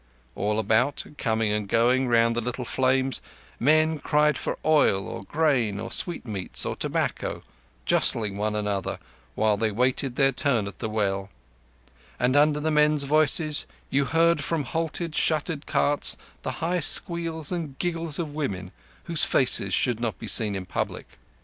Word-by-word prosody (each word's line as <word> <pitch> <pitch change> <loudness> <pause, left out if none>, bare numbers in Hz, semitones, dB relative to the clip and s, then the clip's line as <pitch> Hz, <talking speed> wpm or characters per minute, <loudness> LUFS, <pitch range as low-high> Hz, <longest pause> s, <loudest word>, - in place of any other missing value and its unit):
All 105 +1 -1
about, 110 +6 +1 0.2
coming 110 -2 0
and 105 -1 -2
going 125 +4 +2
round 115 -1 +3
the 120 - 0
little 125 +2 -4
flames, 130 0 +1 0.4
men 155 +3 +3
cried 150 0 +2
for - - -3
oil, 145 -11 +3
or - - -7
grain, 130 -8 +1
or 115 +2 -6
sweetmeats, 110 - -2
or - - -2
tobacco, - - -2 0.4
jostling 105 -4 +2
one 105 +1 -2
another 105 -3 -2 0.4
while 110 -1 +2
they 110 +1 0
waited 125 +3 0
their 135 0 +3
turn 130 -5 +1
at 100 - -9
the 110 - -3
well; 100 -2 -1 0.9
and 125 +2 +2
under 150 0 +4
the 155 +1 -1
men's 150 -1 +3
voices 155 +1 +2 0.2
you 140 +1 +2
heard 165 +1 +2
from 165 -3 -1
halted, 165 +1 -3
shuttered 155 -1 0
carts 145 0 +1 0.2
the - - -3
high 180 +2 0
squeals 165 -3 +1
and 160 -6 -4
giggles 165 -3 -2
of 160 -4 -4
women 95 -12 -4 0.3
whose 165 -2 +2
faces 110 -7 +3
should 115 +4 +1
not 115 -7 -2
be - - -8
seen 105 -3 +2
in 95 -1 -5
public. - - -4
130 Hz, 155 wpm, -25 LUFS, 110-155 Hz, 0.9 s, under